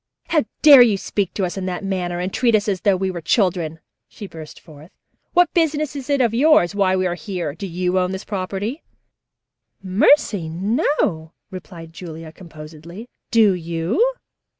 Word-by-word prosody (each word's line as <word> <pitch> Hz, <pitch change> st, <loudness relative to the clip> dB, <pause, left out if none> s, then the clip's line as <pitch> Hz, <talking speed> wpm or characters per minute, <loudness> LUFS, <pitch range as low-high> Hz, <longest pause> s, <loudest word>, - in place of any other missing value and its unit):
"How 310 Hz, -7 st, +2 dB, 0.2 s
dare 285 Hz, -4 st, +10 dB
you 225 Hz, -5 st, +4 dB
speak 195 Hz, -1 st, -2 dB
to 195 Hz, -, 0 dB
us 180 Hz, -, -5 dB
in 190 Hz, -1 st, -4 dB
that 180 Hz, +1 st, -4 dB
manner 180 Hz, -3 st, -3 dB
and 185 Hz, +2 st, -4 dB
treat 235 Hz, -3 st, +2 dB
us 210 Hz, 0 st, 0 dB
as 190 Hz, -3 st, -1 dB
though 200 Hz, -2 st, +2 dB
we 190 Hz, 0 st, -2 dB
were 175 Hz, -2 st, -6 dB
children?" 165 Hz, -3 st, 0 dB, 0.3 s
she 210 Hz, -, -10 dB
burst 160 Hz, -5 st, -11 dB
forth. 155 Hz, 0 st, -15 dB, 0.4 s
"What 355 Hz, 0 st, +3 dB
business 305 Hz, -4 st, 0 dB
is 275 Hz, -1 st, -7 dB
it 280 Hz, -2 st, +2 dB
of 235 Hz, -3 st, +1 dB
yours 250 Hz, -, +4 dB
why 195 Hz, -2 st, +1 dB
we 185 Hz, 0 st, 0 dB
are 175 Hz, -, 0 dB
here? 180 Hz, -5 st, -5 dB
Do 195 Hz, +5 st, -7 dB
you 180 Hz, +1 st, -1 dB
own 180 Hz, 0 st, -1 dB
this 190 Hz, +1 st, -6 dB
property?" 205 Hz, -, -4 dB, 1.0 s
"Mercy, 200 Hz, -, +2 dB
no," 185 Hz, -, -1 dB, 0.2 s
replied 170 Hz, -3 st, -10 dB
Julia 165 Hz, -2 st, -9 dB
composedly. 165 Hz, +5 st, -12 dB, 0.2 s
"Do 225 Hz, -5 st, +4 dB
you?" 175 Hz, -, -1 dB
190 Hz, 175 wpm, -20 LUFS, 170-230 Hz, 1.0 s, dare